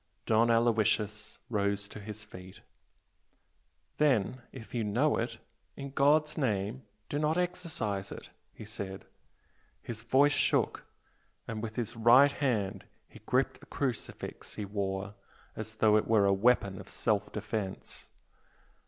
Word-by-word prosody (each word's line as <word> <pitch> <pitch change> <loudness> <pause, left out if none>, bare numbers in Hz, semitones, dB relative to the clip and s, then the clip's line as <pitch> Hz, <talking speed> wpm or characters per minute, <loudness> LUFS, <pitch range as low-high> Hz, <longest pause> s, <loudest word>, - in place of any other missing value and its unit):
Don 115 +2 +4
Aloysius 110 -2 +1
rose 100 -3 0
to 110 - -9
his 105 +1 -7
feet. 95 -3 -12 1.4
"Then, 130 -4 +2
if 120 -4 -11
you 120 -2 0
know 120 +9 +2
it, 115 0 -2 0.4
in 140 -1 -6
God's 150 +3 +3
name 110 -1 -1 0.3
do 145 - -2
not 155 +2 +1
exercise 160 - -2
it!" - - -9 0.2
he 110 - -10
said. 100 -3 -6 0.8
His 115 -2 -6
voice 135 +5 +4
shook - - +1 0.6
and 110 -1 -4
with 110 -1 -5
his 120 0 -3
right 120 +5 +7
hand 120 -9 -1 0.2
he - - -14
gripped - - +1
the - - -16
crucifix 130 -5 -4
he 105 - -4
wore 100 0 -3 0.4
as 110 0 -6
though 110 -1 +4
it 110 - 0
were 110 -3 +4
a 100 - +4
weapon 100 -2 +2
of - - -11
self 105 -3 0
defence. 105 -2 -5
110 Hz, 135 wpm, -31 LUFS, 100-130 Hz, 1.4 s, right